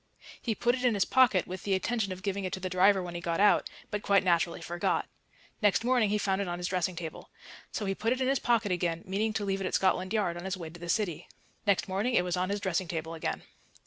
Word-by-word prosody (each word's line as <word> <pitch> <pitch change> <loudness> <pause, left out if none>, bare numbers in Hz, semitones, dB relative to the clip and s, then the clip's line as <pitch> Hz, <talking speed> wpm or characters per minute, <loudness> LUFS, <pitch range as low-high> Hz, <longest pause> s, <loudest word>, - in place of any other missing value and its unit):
He 225 -3 -1
put 240 +4 +2
it 255 0 -3
in 245 -3 +3
his 200 - +2
pocket 240 -8 +4
with 185 0 -6
the 195 -1 +1
intention 205 +1 -1
of 185 +1 -7
giving 200 -1 -2
it 185 - -3
to - - -3
the 185 0 -4
driver 190 +1 +4
when 175 -1 -6
he 175 - -5
got 170 0 -1
out, 205 +1 +4 0.2
but 210 - -2
quite 200 -1 +3
naturally 170 -2 +2
forgot. 175 0 -1 0.5
Next 205 +1 +3
morning 245 -3 +3
he 210 - +2
found 195 -1 0
it 200 - -2
on 175 0 -3
his 175 0 -3
dressing 185 -1 -1
table. 165 -2 -7 0.4
So 210 - -3
he 195 - 0
put 225 +4 -1
it 255 - 0
in 260 - +1
his 270 -1 +2
pocket 230 -4 +1
again, 170 -2 -1
meaning 205 +4 0
to 210 -1 -2
leave 195 0 -1
it 190 - -1
at - - -1
Scotland 185 0 +1
Yard 200 -6 0
on 175 - -7
his 190 -1 -2
way 165 -3 -7
to 170 - -12
the 175 0 -7
City. 180 -5 -1 0.4
Next 200 -1 +3
morning 200 +6 0
it - - +4
was 180 0 -1
on 180 +1 -1
his 200 +1 -1
dressing 185 -2 -1
table 160 0 -4
again. 160 - -3
190 Hz, 270 wpm, -30 LUFS, 175-210 Hz, 0.5 s, pocket